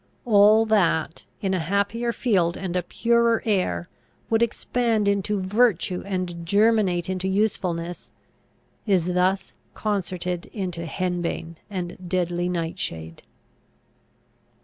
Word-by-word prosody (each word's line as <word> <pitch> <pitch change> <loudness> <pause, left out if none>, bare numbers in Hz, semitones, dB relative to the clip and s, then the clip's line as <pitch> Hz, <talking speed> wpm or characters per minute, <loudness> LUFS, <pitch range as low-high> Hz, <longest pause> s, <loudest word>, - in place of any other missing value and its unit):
All 215 0 +6
that, 175 -7 +1 0.2
in 195 -2 0
a 185 - +1
happier 200 +7 0
field 190 -9 +1
and 185 -2 -4
a 180 - +2
purer 235 +5 +2
air, 190 -4 0 0.4
would 225 0 +3
expand 235 -2 +1
into 200 +1 +1
virtue 190 -2 +1
and 180 -3 -3
germinate 200 -2 +2
into 185 0 -2
usefulness, 180 -4 -1 0.8
is 180 -3 +2
thus 185 +2 +1 0.2
concerted 180 -4 -2
into 180 -4 -4
henbane 175 -2 -3
and 180 -2 -6
deadly 175 -1 0
nightshade. 165 - -4
185 Hz, 105 wpm, -24 LUFS, 175-210 Hz, 0.8 s, All